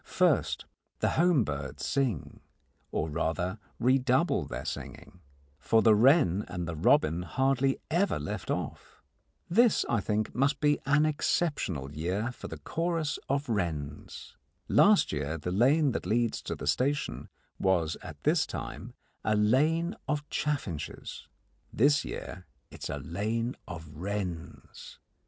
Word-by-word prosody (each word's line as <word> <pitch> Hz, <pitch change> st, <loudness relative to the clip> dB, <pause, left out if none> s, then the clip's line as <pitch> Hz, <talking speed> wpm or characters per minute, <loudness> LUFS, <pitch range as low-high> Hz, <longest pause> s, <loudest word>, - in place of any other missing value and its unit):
First, -, -, +1 dB, 0.3 s
the -, -, +1 dB
home 170 Hz, -6 st, +4 dB
birds 70 Hz, -5 st, -5 dB
sing, 130 Hz, -, -1 dB, 0.5 s
or 75 Hz, -, -1 dB
rather 90 Hz, +6 st, -2 dB, 0.2 s
redouble 130 Hz, -, +2 dB
their -, -, -5 dB
singing, 90 Hz, -, -7 dB, 0.4 s
for 110 Hz, -, +3 dB
the 110 Hz, -, +7 dB
wren 105 Hz, -, +4 dB
and 90 Hz, -2 st, -4 dB
the 85 Hz, -, -4 dB
robin 90 Hz, -, +3 dB
hardly 135 Hz, +7 st, +1 dB
ever 180 Hz, +5 st, +2 dB
left 75 Hz, 0 st, -5 dB
off. -, -, -5 dB, 0.4 s
This, 230 Hz, +5 st, +4 dB
I 115 Hz, -3 st, +1 dB
think, 105 Hz, +1 st, -1 dB
must 140 Hz, +3 st, +1 dB
be 145 Hz, -1 st, +3 dB
an 145 Hz, +2 st, +4 dB
exceptional 145 Hz, -, -1 dB
year 95 Hz, +9 st, -2 dB
for -, -, -9 dB
the -, -, -7 dB
chorus 165 Hz, -3 st, -2 dB
of 140 Hz, +1 st, 0 dB
wrens. 80 Hz, -, -4 dB, 0.3 s
Last 205 Hz, 0 st, +5 dB
year 75 Hz, +1 st, -2 dB
the 85 Hz, +3 st, -4 dB
lane 135 Hz, -, +4 dB
that 105 Hz, -, -3 dB
leads 115 Hz, +2 st, +1 dB
to -, -, -4 dB
the -, -, -7 dB
station 140 Hz, +3 st, 0 dB, 0.3 s
was 85 Hz, -4 st, +2 dB
at -, -, -10 dB
this -, -, +3 dB
time -, -, -7 dB, 0.3 s
a 110 Hz, -, +2 dB
lane 150 Hz, -, +2 dB
of 150 Hz, -1 st, -2 dB
chaffinches: 130 Hz, -, -3 dB, 0.4 s
this 145 Hz, +5 st, +3 dB
year 90 Hz, 0 st, -7 dB, 0.2 s
it -, -, -12 dB
is -, -, -4 dB
a -, -, -3 dB
lane 110 Hz, +7 st, -2 dB
of 80 Hz, -1 st, -7 dB
wrens. 90 Hz, 0 st, -6 dB
115 Hz, 140 wpm, -29 LUFS, 85-145 Hz, 0.5 s, the